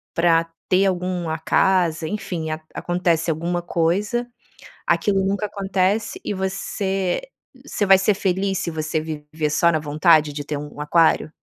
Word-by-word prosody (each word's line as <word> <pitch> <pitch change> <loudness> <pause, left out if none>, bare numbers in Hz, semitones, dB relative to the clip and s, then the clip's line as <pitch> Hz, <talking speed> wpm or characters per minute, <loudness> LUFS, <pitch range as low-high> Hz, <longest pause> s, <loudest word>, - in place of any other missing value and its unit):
pra 165 -1 +3 0.2
ter 190 +2 +3
algum 180 -2 -2
a 160 - -1
casa, 165 -1 +1
enfim, 170 -4 -4
a 155 0 -3
acontece 175 -2 0
alguma 170 +2 -1
coisa, 195 +8 0 0.6
aquilo 190 +3 +2
nunca 200 +2 0
acontece. 195 +1 -1
E - - -2
você 190 - -2 0.4
você 215 - -1
vai 195 0 +8
ser 195 +2 +2
feliz, 190 0 0
se - - -2
você 155 0 -2
viver 155 0 -4
só 170 +3 +3
na 160 - +1
vontade 150 0 +3
de 145 0 -5
ter 150 0 -4
um 145 0 -9
aquário? 160 +1 +2
175 Hz, 150 wpm, -22 LUFS, 160-190 Hz, 0.6 s, vai